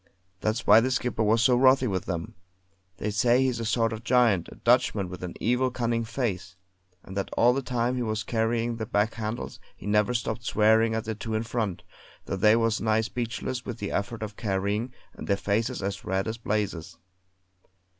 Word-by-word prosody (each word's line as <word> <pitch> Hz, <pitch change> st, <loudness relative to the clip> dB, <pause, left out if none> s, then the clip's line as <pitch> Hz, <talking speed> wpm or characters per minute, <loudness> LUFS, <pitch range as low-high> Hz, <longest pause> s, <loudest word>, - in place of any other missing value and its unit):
That's 110 Hz, +4 st, -1 dB
why 105 Hz, +2 st, +8 dB
the 125 Hz, +3 st, +1 dB
skipper 125 Hz, -3 st, -1 dB
was 110 Hz, +1 st, +3 dB
so 125 Hz, +1 st, +5 dB
wrathy 130 Hz, +1 st, +5 dB
with 95 Hz, -6 st, -2 dB
them. 85 Hz, -3 st, -4 dB, 0.6 s
They 105 Hz, -, -2 dB
say 120 Hz, +4 st, +3 dB
he's 130 Hz, -3 st, 0 dB
a 115 Hz, -, -3 dB
sort 115 Hz, +1 st, +1 dB
of 110 Hz, 0 st, -7 dB
giant, 115 Hz, -8 st, +3 dB
a -, -, -11 dB
Dutchman 115 Hz, -6 st, +2 dB
with 90 Hz, 0 st, -8 dB
an 90 Hz, -1 st, -6 dB
evil, 125 Hz, +2 st, +1 dB
cunning 115 Hz, -2 st, -1 dB
face; 110 Hz, -6 st, -3 dB, 0.5 s
and 95 Hz, -, -10 dB
that 100 Hz, -, -2 dB
all 120 Hz, +1 st, +5 dB
the 135 Hz, -, -1 dB
time 125 Hz, 0 st, -1 dB
he -, -, -1 dB
was 110 Hz, -2 st, -2 dB
carrying 115 Hz, 0 st, -1 dB
the 110 Hz, -2 st, -4 dB
back 105 Hz, +2 st, +1 dB
handles 110 Hz, +1 st, -5 dB, 0.2 s
he -, -, -13 dB
never 105 Hz, +3 st, +2 dB
stopped 115 Hz, -1 st, -2 dB
swearing 110 Hz, +1 st, +3 dB
at 110 Hz, -, -2 dB
the 110 Hz, -, -3 dB
two 110 Hz, +1 st, -4 dB
in 110 Hz, -, 0 dB
front, 115 Hz, -5 st, -3 dB, 0.4 s
though -, -, -3 dB
they 105 Hz, +3 st, +5 dB
was 115 Hz, -1 st, +1 dB
nigh 110 Hz, 0 st, +2 dB
speechless 120 Hz, +2 st, -4 dB
with 120 Hz, -3 st, -6 dB
the 100 Hz, -3 st, -4 dB
effort 110 Hz, +2 st, -3 dB
of 105 Hz, -1 st, -6 dB
carrying, 100 Hz, +4 st, -1 dB, 0.2 s
and -, -, -9 dB
their 100 Hz, -, +2 dB
faces 100 Hz, +1 st, -1 dB
as 100 Hz, 0 st, -3 dB
red 95 Hz, +2 st, -1 dB
as 110 Hz, +1 st, -4 dB
blazes. 105 Hz, -7 st, -3 dB
110 Hz, 200 wpm, -27 LUFS, 105-120 Hz, 0.6 s, why